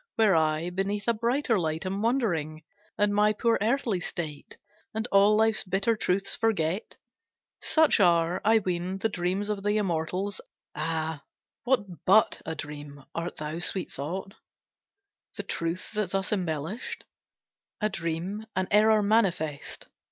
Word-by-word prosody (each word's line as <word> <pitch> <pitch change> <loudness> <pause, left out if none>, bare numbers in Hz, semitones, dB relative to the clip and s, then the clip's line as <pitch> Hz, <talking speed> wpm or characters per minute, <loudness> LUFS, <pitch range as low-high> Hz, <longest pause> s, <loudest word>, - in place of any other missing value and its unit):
Where 215 -5 +4
I 160 +2 +1
Beneath 195 +2 -2
a 235 - +4
brighter 235 0 +1
light 160 0 -2
am 195 +2 -2
wandering, 175 - 0 0.3
And 205 0 +2
my 210 +1 +4
poor 230 +2 +1
earthly 225 -3 +1
state, 155 -4 -6 0.4
And 220 0 -1
all 200 +2 +6
life's 220 0 +3
bitter 195 +4 +1
truths 195 -1 0
forget! 195 -4 -1 0.6
Such 315 -6 +4
are, 170 -2 +3
I 225 +2 +5
ween, 185 -2 -2
the 220 +3 0
dreams 190 +2 -1
Of 205 -1 -3
the 205 +1 +1
Immortals. 185 +1 -2 0.3
Ah, 160 0 -2 0.4
what 245 -4 +2 0.2
but 215 +4 +5
a 160 - -3
dream, 145 -2 -8
Art 165 +1 -4
thou, 155 +2 -5
sweet 180 +1 +1
thought, 185 +8 -5 1.0
The - - -5
truth, 165 +2 -3
that 210 -4 -1
thus 195 +2 -1
embellished? 175 - -3 0.8
A 215 - +2
dream, 180 +4 -4
an 185 0 0
error 215 0 +5
manifest! 185 -9 0
195 Hz, 140 wpm, -27 LUFS, 165-215 Hz, 1.0 s, all